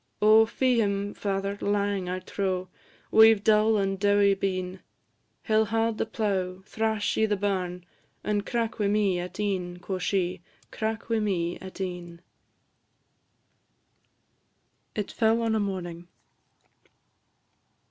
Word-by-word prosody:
Oh, 220 Hz, +1 st, +6 dB
fee 250 Hz, 0 st, +2 dB
him, 200 Hz, -1 st, -1 dB
father; 200 Hz, 0 st, -2 dB
lang, 200 Hz, -2 st, 0 dB
I 185 Hz, -, -2 dB
trow, 185 Hz, -1 st, -3 dB, 0.4 s
We 220 Hz, 0 st, +8 dB
've 200 Hz, -, -11 dB
dull 215 Hz, 0 st, +4 dB
and 195 Hz, -1 st, -1 dB
dowie 200 Hz, 0 st, +4 dB
been: 185 Hz, -1 st, -3 dB, 0.6 s
He 220 Hz, -, -2 dB
'll 220 Hz, 0 st, +4 dB
haud 225 Hz, +1 st, 0 dB
the -, -, 0 dB
plough, 190 Hz, -4 st, -2 dB
thrash 220 Hz, -1 st, -1 dB
i' 220 Hz, -, +3 dB
the 205 Hz, -1 st, 0 dB
barn, 180 Hz, -3 st, -2 dB, 0.4 s
And 205 Hz, -1 st, 0 dB
crack 230 Hz, 0 st, -2 dB
wi' 205 Hz, -, +2 dB
me 200 Hz, -3 st, +2 dB
at 180 Hz, +3 st, -7 dB
e'en," 185 Hz, -4 st, -2 dB
quo' 185 Hz, +1 st, -4 dB
she; 180 Hz, -2 st, -1 dB, 0.3 s
"Crack 220 Hz, 0 st, -3 dB
wi' 225 Hz, -1 st, +1 dB
me 180 Hz, -5 st, -1 dB
at 190 Hz, 0 st, -10 dB
e'en." 175 Hz, -2 st, -5 dB, 2.8 s
IT 210 Hz, -2 st, -3 dB
FELL 225 Hz, 0 st, +2 dB
ON 225 Hz, -1 st, +1 dB
A 220 Hz, -, +2 dB
MORNING. 175 Hz, -4 st, -4 dB
200 Hz, 135 wpm, -27 LUFS, 185-220 Hz, 2.8 s, We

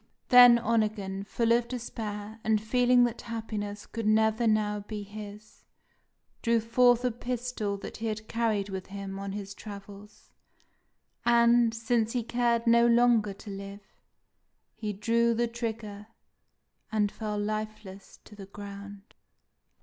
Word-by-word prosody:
Then 245 Hz, -1 st, +9 dB
Onegin, 215 Hz, -4 st, -1 dB
full 230 Hz, +2 st, 0 dB
of 235 Hz, 0 st, +3 dB
despair, 220 Hz, -3 st, -6 dB
and 220 Hz, -1 st, +2 dB
feeling 245 Hz, +3 st, +3 dB
that 240 Hz, -1 st, -1 dB
happiness 215 Hz, -3 st, -5 dB
could 225 Hz, -2 st, -4 dB
never 220 Hz, +2 st, +3 dB
now 210 Hz, -1 st, +1 dB
be 205 Hz, 0 st, -6 dB
his, 210 Hz, +1 st, -11 dB, 0.8 s
drew 230 Hz, -1 st, +2 dB
forth 245 Hz, +2 st, +3 dB
a 250 Hz, -, +2 dB
pistol 240 Hz, -3 st, -3 dB
that -, -, -8 dB
he 225 Hz, -, -4 dB
had 215 Hz, 0 st, -4 dB
carried 220 Hz, -4 st, 0 dB
with 190 Hz, -1 st, -6 dB
him 195 Hz, 0 st, -6 dB
on 195 Hz, 0 st, -5 dB
his 200 Hz, -1 st, -6 dB
travels; 205 Hz, 0 st, -12 dB, 0.9 s
and, 235 Hz, 0 st, +4 dB
since 230 Hz, 0 st, 0 dB
he 245 Hz, -2 st, -1 dB
cared 235 Hz, 0 st, 0 dB
no 235 Hz, 0 st, +5 dB
longer 235 Hz, -3 st, +4 dB
to 200 Hz, +1 st, -10 dB
live, 200 Hz, 0 st, -9 dB, 0.8 s
he 215 Hz, -2 st, -4 dB
drew 230 Hz, +3 st, +1 dB
the 235 Hz, +1 st, +1 dB
trigger, 220 Hz, -3 st, -5 dB, 0.8 s
and 210 Hz, -2 st, +1 dB
fell 215 Hz, -1 st, -4 dB
lifeless 215 Hz, -2 st, -5 dB
to 210 Hz, -, -15 dB
the 195 Hz, -2 st, -10 dB
ground! 200 Hz, 0 st, -10 dB
220 Hz, 135 wpm, -28 LUFS, 205-235 Hz, 0.9 s, Then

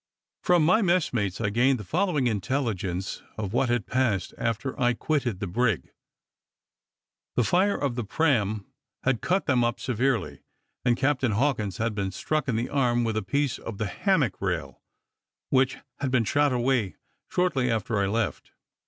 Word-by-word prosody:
From 175 Hz, -3 st, +4 dB
my 185 Hz, +7 st, +4 dB
messmates 125 Hz, -, +1 dB
I 105 Hz, -3 st, 0 dB
gained 125 Hz, +4 st, +3 dB
the 105 Hz, -, -7 dB
following 160 Hz, -, 0 dB
intelligence 105 Hz, -5 st, -2 dB, 0.2 s
of 105 Hz, -2 st, -4 dB
what 120 Hz, +1 st, +2 dB
had 120 Hz, -5 st, +1 dB
passed 120 Hz, -8 st, 0 dB
after 115 Hz, +3 st, -2 dB
I 120 Hz, -, +4 dB
had 120 Hz, -, +1 dB
quitted 130 Hz, -10 st, -1 dB
the 100 Hz, -, -2 dB
brig. 105 Hz, +1 st, 0 dB, 1.4 s
The 125 Hz, -, +3 dB
fire 185 Hz, -, +2 dB
of 140 Hz, -4 st, -1 dB
the 120 Hz, 0 st, -3 dB
praam 110 Hz, -5 st, +1 dB, 0.4 s
had 130 Hz, -3 st, +1 dB
cut 190 Hz, +2 st, +1 dB
them 125 Hz, -3 st, +3 dB
up 120 Hz, 0 st, 0 dB
severely, 130 Hz, 0 st, -1 dB, 0.4 s
and 120 Hz, -1 st, +2 dB
Captain 130 Hz, -4 st, +1 dB
Hawkins 110 Hz, -5 st, 0 dB
had 115 Hz, 0 st, -1 dB
been 100 Hz, -2 st, -2 dB
struck 155 Hz, +10 st, -2 dB
in 125 Hz, -, 0 dB
the 115 Hz, +3 st, -1 dB
arm 120 Hz, -4 st, +2 dB
with 110 Hz, -1 st, -1 dB
a 110 Hz, -, +1 dB
piece 140 Hz, 0 st, -1 dB
of 110 Hz, -, -7 dB
the 110 Hz, -, -1 dB
hammock 140 Hz, -, 0 dB
rail, 80 Hz, -9 st, -3 dB, 0.7 s
which 130 Hz, 0 st, +3 dB, 0.2 s
had 140 Hz, -, -1 dB
been 125 Hz, -3 st, +2 dB
shot 145 Hz, +4 st, +2 dB
away 125 Hz, -5 st, +1 dB, 0.3 s
shortly 150 Hz, -9 st, +1 dB
after 110 Hz, -1 st, 0 dB
I 100 Hz, -, +2 dB
left. 110 Hz, +2 st, -2 dB
120 Hz, 170 wpm, -26 LUFS, 105-140 Hz, 1.4 s, From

